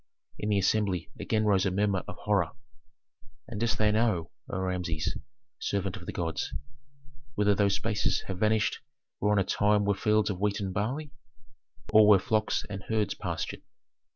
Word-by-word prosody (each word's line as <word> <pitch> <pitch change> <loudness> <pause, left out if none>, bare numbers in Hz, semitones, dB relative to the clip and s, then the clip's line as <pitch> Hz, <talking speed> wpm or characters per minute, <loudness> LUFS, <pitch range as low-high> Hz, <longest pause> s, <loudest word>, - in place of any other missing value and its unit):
In 105 - -2
the 105 - +3
assembly 95 -3 +1
again 110 -1 0
rose 100 -3 +3
a - - +2
murmur 100 0 +1
of - - -6
horror. 105 -1 +1 0.9
"And 110 -3 -5
dost 115 +1 +1
thou 105 -1 +3
know, 105 -7 +1 0.2
O - - -3
Rameses, 90 -4 -2 0.4
servant 100 -1 -1
of 90 -4 -10
the - - -2
gods, 80 -3 -3 0.8
whither 105 0 +3
those 100 0 +2
spaces 110 0 0
have 95 -2 -5
vanished 110 0 +2 0.4
where 105 - +2
on 105 - +3
a 100 - +4
time 105 +2 +2
were 100 - +3
fields 105 +1 +2
of 90 - -5
wheat 105 +1 0
and 95 -2 -3
barley, 130 +9 -2 0.8
or 110 -1 +8
where 105 -2 +8
flocks 110 +3 0
and 100 -1 -6
herds 110 -2 +1
pastured? 85 -5 -4
105 Hz, 170 wpm, -29 LUFS, 95-105 Hz, 0.9 s, or